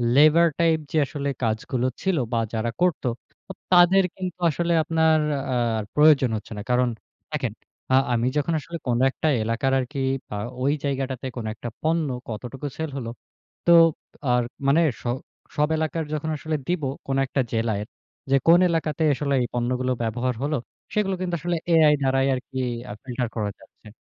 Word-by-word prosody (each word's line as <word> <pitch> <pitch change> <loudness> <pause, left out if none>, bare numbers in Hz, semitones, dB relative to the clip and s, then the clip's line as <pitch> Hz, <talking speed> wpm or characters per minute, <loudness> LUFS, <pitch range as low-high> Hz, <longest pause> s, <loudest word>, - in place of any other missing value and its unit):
Labour 155 +4 +6
type 165 -1 +3
যে - - 0
আসলে 140 -1 -3
কাজগুলো 115 +3 0
ছিল 190 -4 +1 0.2
বা 115 - +2
যারা 115 +1 -1
করত, 180 -3 +2 0.4
তো - - -7 0.2
তাদের 180 +2 +6
কিন্তু 180 -1 -5
আসলে 170 +3 0
আপনার 160 0 +3 0.6
আর - - -3
প্রয়োজন 150 -4 +6
হচ্ছেনা। 105 0 -7
কারণ 125 0 +3 0.5
দেখেন - - -1 0.4
আ - - +7 0.2
আমি 120 +1 +1
যখন 150 +3 0
আসলে 170 +3 -7
কোন 120 -1 +1
একটা 155 - -2 0.2
এলাকার 115 +4 0
আর 130 - -1
কি 140 - -3 0.4
আ - - -3 0.3
ওই 140 - +3
জায়গাটাতে 135 -2 -2
কোন 115 - -4
একটা 120 +2 -6
পণ্য 160 0 +1 0.2
কতটুকু 125 +6 -5
সেল 160 0 -3
হলো 115 -4 -4 0.6
তো 170 - +5 0.6
আর 125 0 +3 0.2
মানে 140 +4 +5 0.2
স - - -23 0.5
সব 150 +1 +2
এলাকার 160 +1 -1
যখন 155 +1 -2
আসলে 155 +1 -3
দিব 175 -3 -1 0.2
কোন 135 0 0
একটা 135 - 0
জেলায় 110 -2 0 0.5
যে, - - +6
কোন 170 +2 +8
এলাকাতে 160 -1 -1
আসলে 140 +1 -1
এই 120 - 0
পণ্যগুলো 125 +1 0
ব্যবহার 120 +3 -1
হলো? 150 +1 0 0.4
সেগুলো 195 -3 +1
কিন্তু 180 -2 -1
আসলে 175 +2 -1 0.2
এআই 155 -2 +6
দ্বারাই 135 0 +2
আরকি 130 +1 -6 0.3
আ - - -4
ফিল্টার 125 -2 -3
করা 105 -3 -1
যাচ্ছে। - - -19
140 Hz, 165 wpm, -24 LUFS, 125-160 Hz, 0.6 s, কোন